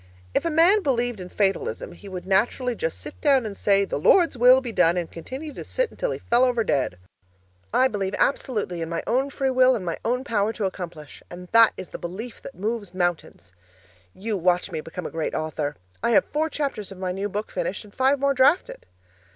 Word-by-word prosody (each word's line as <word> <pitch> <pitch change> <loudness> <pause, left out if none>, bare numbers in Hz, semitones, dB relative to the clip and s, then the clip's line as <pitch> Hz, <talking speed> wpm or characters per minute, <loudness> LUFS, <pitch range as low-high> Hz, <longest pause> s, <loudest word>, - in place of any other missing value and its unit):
If - - +1
a - - +2
man 340 +7 +5
believed 245 - 0
in 180 -1 -7
fatalism, 420 - -1
he 200 - -12
would 185 -1 -6
naturally 230 +6 +1
just - - -3
sit - - -10
down 275 -5 +4
and 205 -2 -5
say, 200 -1 +3
'The 145 - -3
Lord's 335 - +4
will 250 +2 +7
be 250 -3 -5
done,' 180 -4 +3
and 170 -2 -3
continue 265 - -7
to - - -7
sit - - -1
until - - -3
he - - -2
fell 240 +2 +2
over 245 -3 +2
dead. 130 - 0 0.7
I 260 - +4
believe 200 -5 -2
absolutely 210 -10 0
in 165 - -3
my 170 - -3
own 260 +4 +1
free 270 -1 -1
will 255 0 +5
and 200 -6 -4
my 170 - -3
own 250 +3 0
power 220 -4 0
to 215 - -2
accomplish 175 -5 -7
and 180 0 -10
that 230 0 +6
is 185 - -7
the - - -8
belief 205 +7 -7
that 270 - -10
moves 205 -2 -4
mountains. 175 - -2 0.6
You 215 +2 -3
watch 180 +1 +1
me 160 -2 -3
become 165 +2 -7
a - - -5
great 165 -1 -3
author! 155 -2 -2 0.3
I 235 - +1
have - - +5
four 310 +2 -1
chapters 275 -11 -3
of 195 - -9
my 185 -1 -2
new 195 +3 -3
book 210 +2 -4
finished 190 - -3
and 205 -1 -16
five 265 +2 +2
more 280 0 +2
drafted. 275 +7 +2
215 Hz, 215 wpm, -24 LUFS, 180-260 Hz, 0.7 s, will